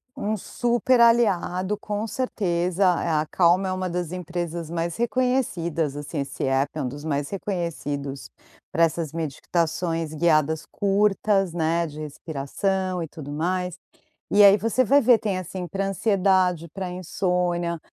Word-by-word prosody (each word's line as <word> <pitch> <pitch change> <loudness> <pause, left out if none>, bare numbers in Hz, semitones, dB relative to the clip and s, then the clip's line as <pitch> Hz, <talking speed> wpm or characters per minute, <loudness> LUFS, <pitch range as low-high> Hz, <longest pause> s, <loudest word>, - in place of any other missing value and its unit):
um 215 +1 -1
super 240 +4 +1
aliado, 210 -4 +3
com 210 +1 -3
certeza. 185 -7 -1 0.2
É, - - -2
a 155 -1 +1
Calm 180 +2 +4
é 185 - -1
uma 185 0 -2
das 175 -1 -3
empresas 175 -2 -4
mais 170 0 -2
reconhecidas, 225 - 0
assim. 145 +1 -5
Esse 140 +1 -4
app 135 +1 +1
é 150 - -1
um - - -1
dos 145 +3 -7
mais 145 -2 -1
reconhecidos 150 -8 -4 0.4
pra 165 - +2
essas 165 -2 0
meditações 165 +1 -2
guiadas 155 -1 +2
curtas, 200 -2 +1
né, 170 0 +1
de 150 +1 -8
respiração 170 +5 -2
e 165 - -3
tudo 145 -2 -9
mais. 180 +3 -1 0.6
E 205 +1 +6
aí 200 +1 +8
você 230 +5 +1
vai 280 +6 +5
ver. 240 -3 +5
Tem, 200 -4 -2
assim, 185 0 -5
pra 195 +2 -2
ansiedade; 185 -4 +2
pra 190 -2 -4
insônia. 180 -1 -1
175 Hz, 145 wpm, -24 LUFS, 160-195 Hz, 0.6 s, aí